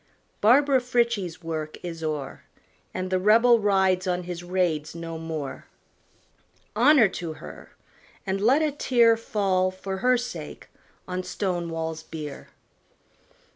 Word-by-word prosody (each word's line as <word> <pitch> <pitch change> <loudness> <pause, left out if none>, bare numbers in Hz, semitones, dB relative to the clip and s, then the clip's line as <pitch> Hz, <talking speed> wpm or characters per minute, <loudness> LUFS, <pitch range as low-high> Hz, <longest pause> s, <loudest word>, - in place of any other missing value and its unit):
Barbara 265 +4 +5
Frietchie's 235 -9 -1
work 155 -2 -4
is 165 -2 -6
o'er. 150 -3 -4 0.5
And 185 0 -4
the 185 - +2
Rebel 230 +4 +5
rides 190 -2 +2
on 180 0 -1
his 175 0 -6
raids 175 -4 -1
no 165 -1 -6
more. 160 -4 -6 1.1
Honor 250 0 +6
to 170 -3 -5
her! - - -12 0.5
and 195 0 -2
let 265 +9 +4
a 305 - +1
tear 240 -5 +3
Fall, 195 -4 0
for 190 +1 -6
her 250 +4 +3
sake, 245 +1 -7 0.4
on 185 0 -3
Stonewall's 170 -3 -3
bier. 155 -3 -8
185 Hz, 125 wpm, -25 LUFS, 165-230 Hz, 1.1 s, Honor